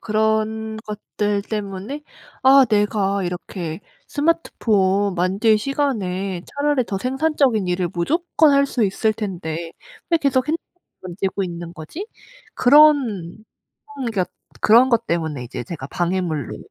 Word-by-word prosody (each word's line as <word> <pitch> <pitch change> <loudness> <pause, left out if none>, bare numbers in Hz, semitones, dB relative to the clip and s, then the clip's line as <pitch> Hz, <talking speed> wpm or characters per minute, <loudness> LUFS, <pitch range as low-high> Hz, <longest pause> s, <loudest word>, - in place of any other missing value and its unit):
그런 220 0 0
것들 210 -1 -2
때문에 210 +6 -5 0.4
'아 270 0 +7
내가 205 -2 +1
이렇게 175 -1 -5 0.3
스마트폰 205 - +1
만질 195 +5 +2
시간에 200 -9 -2
차라리 285 -3 0
더 195 - -3
생산적인 260 -5 +1
일을 180 0 0
무조건 315 - +2
할 280 0 +4
수 250 -3 -1
있을 215 +3 +1
텐데 170 -6 -5 0.4
왜 335 - +4
계속 275 -2 +1
핸드폰만 325 +2 -1 0.4
만지고 190 +2 -3
있는 170 -1 -6
거지?' 240 - -7 0.5
그런 255 - +4 0.6
그런 275 -2 -5
그러니까 195 -5 0 0.4
그런 235 +4 +6
것 235 -2 +1
때문에 160 -6 -2
이제 120 0 -6
제가 130 +1 -7
방해물로 175 -6 -2
210 Hz, 275 characters per minute, -21 LUFS, 180-260 Hz, 0.6 s, 아